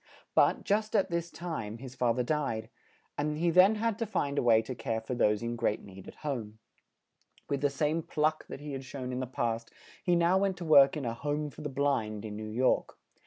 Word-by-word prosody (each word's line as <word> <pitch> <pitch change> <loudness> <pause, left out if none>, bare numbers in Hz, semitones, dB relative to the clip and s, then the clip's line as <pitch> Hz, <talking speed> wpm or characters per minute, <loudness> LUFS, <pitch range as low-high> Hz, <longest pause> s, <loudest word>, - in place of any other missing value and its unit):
But, - - +4
just 215 +2 0
at 195 -3 +2
this 170 0 -1
time, 135 -13 -5
his 130 +1 -9
fa 125 -2 +1
ther 125 +2 0
died; 120 -5 -2 0.5
and 150 +1 -1
he 170 +2 +2
then 185 +5 +6
had 225 0 -1
to 230 - -1
find 140 -8 0
a - - +2
way 115 -2 +5
to 130 - -5
care 115 -2 -2
for 110 +3 -5
those 105 -2 +2
in 120 0 -2
great 115 -2 -1
need 95 -1 -12
at - - -10
home. 115 -7 -3 0.9
With 140 -1 -1
the 145 - +3
same 150 +4 0
pluck 155 0 0
that - - -8
he 150 0 -6
had 135 -1 -5
shown 130 -1 -6
in 125 - -3
the 130 - -3
past, 115 -2 -2 0.3
he 180 -2 +3
now 170 +2 +4
went 195 -2 0
to 175 - -6
work 140 -2 +7
in 140 - -4
a 115 - -1
"Home 145 +4 -2
for - - -11
the 150 - -3
Blind," 125 -7 -1
in 105 -1 -6
New 110 0 -6
York. 125 +4 +1
140 Hz, 230 wpm, -30 LUFS, 115-160 Hz, 0.9 s, work